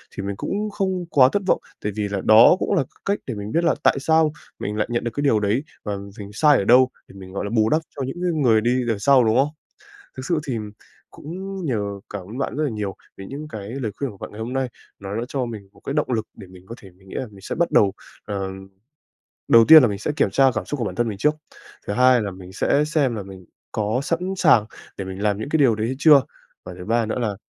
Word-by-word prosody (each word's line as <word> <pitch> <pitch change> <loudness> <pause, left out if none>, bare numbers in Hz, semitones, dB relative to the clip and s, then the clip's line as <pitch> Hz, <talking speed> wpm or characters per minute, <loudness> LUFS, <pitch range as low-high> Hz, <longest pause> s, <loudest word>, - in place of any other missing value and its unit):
thì 100 - -4
mình 100 0 -3
cũng 210 +2 -3
không 190 -3 -2
quá 130 -2 +6
thất 205 - 0
vọng. - - +3 0.2
Tại 105 - -1
vì 105 -1 -1
là 100 -1 -3
đó 110 +10 +7
cũng - - -1
là 165 -8 +2
cái - - -21
cách 200 +1 0
để 125 - -3
mình 105 +1 -6
biết 170 - +1
là - - +3
tại - - +4
sao 160 +1 +3 0.3
mình 105 - -4
lại 105 - 0
nhận 120 - -1
được 120 - -2
cái 145 - -2
điều 115 -6 +3
đấy 105 +6 0 0.2
và 105 -1 -3 0.2
mình 100 - -7
sai 150 +4 +4
ở - - 0
đâu 125 +5 +5 0.2
để - - -16
mình, 95 -1 -11
gọi 100 - -3
là, - - -3
bù 110 0 +3
đắp 155 +1 +2
cho 140 - -3
những 135 - -6
cái 180 -1 +1
người 120 -9 +3
đi 120 +2 +1 0.2
đằng 110 -3 -1
sau, 130 +2 +5
đúng 110 +1 +2
không? 140 +2 +3 0.7
Thực 130 - -6
sự 170 0 +1
thì 125 -4 -2 0.5
cũng 160 +4 -9 0.3
nhờ 120 -9 -1 0.3
cảm 100 -2 -5
ơn 110 +6 -8
bạn 135 - -3
rất 155 - 0
là 145 - -1
nhiều 105 -3 -4 0.2
về 95 - -9
những 150 +3 -7
cái 105 -6 -7
lời 120 -5 -4
khuyên 140 -3 -3
của 100 - -13
bạn - - -8
ngày 105 - -10
hôm 115 +3 -4
nay. 130 -1 -1 0.3
Nó 100 +1 -6
đã 115 - -2
cho 135 -2 -2
mình 105 -4 -8
một - - -21
cái - - -3
động 150 -4 0
lực 110 -2 -1
để 100 - -11
mình 90 0 -15
có 115 - -8
thể 95 - -14
mình 95 +2 -22
nghĩ - - -10
là 130 - -3
mình 100 -3 -15
sẽ - - -4
bắt 170 0 0
đầu, 100 -2 +4 0.3
ờ, 100 -2 -4 1.0
đầu 115 -1 +7
tiên 160 -1 +11
là 125 - +4
mình 100 -1 -3
sẽ - - -2
kiểm 125 - +2
tra 135 +6 +4
cảm 105 - -2
xúc 145 - -4
của 120 - -1
bản - - -4
thân 120 -1 0
mình 105 - -4
trước, 150 +9 +2 0.5
thứ 100 - -1
hai 125 0 +5
là 100 -2 -3
mình 95 0 -12
sẽ 140 +8 +2
xem 145 -6 0
là 105 - -5
mình 95 -2 -12 0.3
có 110 +3 -1
sẵn 165 +4 -1 0.2
sàng 140 - +5 0.3
để 95 - -4
mình 95 +1 -7
làm 105 -1 +1
những 110 - -5
cái 160 - +2
điều 125 -6 +4
đấy 110 +1 -2
hay 130 - -3
chưa, 150 -4 +7 0.4
và 90 - -7
thứ 90 - -8
ba 115 +1 +1
nữa 110 - -3
là 105 -4 -1
115 Hz, 280 wpm, -22 LUFS, 100-140 Hz, 1.0 s, tiên